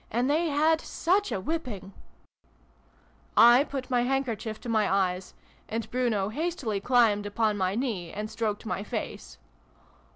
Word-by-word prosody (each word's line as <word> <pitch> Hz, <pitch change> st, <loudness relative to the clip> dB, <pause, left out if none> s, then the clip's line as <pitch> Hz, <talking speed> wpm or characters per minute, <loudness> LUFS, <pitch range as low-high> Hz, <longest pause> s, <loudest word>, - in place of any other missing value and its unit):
And 240 Hz, +3 st, 0 dB
they 315 Hz, +4 st, +2 dB
had 315 Hz, +2 st, +2 dB
such 390 Hz, +5 st, 0 dB
a -, -, -1 dB
whipping 210 Hz, -, -4 dB, 0.8 s
!" -, -, -34 dB, 0.2 s
(I 265 Hz, -, +5 dB
put 275 Hz, -3 st, -6 dB
my 245 Hz, -1 st, +3 dB
handkerchief 240 Hz, -4 st, -2 dB
to -, -, -8 dB
my 220 Hz, -2 st, +1 dB
eyes, 185 Hz, -1 st, 0 dB, 0.3 s
and 225 Hz, +1 st, -3 dB
Bruno 230 Hz, -6 st, 0 dB
hastily 280 Hz, -, -2 dB
climbed 220 Hz, -4 st, +3 dB
upon 215 Hz, 0 st, +1 dB
my 190 Hz, -1 st, 0 dB
knee 215 Hz, -9 st, -2 dB
and 210 Hz, +1 st, -4 dB
stroked 215 Hz, -1 st, -3 dB
my 185 Hz, -2 st, -2 dB
face. 65 Hz, -, -6 dB
225 Hz, 150 wpm, -27 LUFS, 205-270 Hz, 0.8 s, I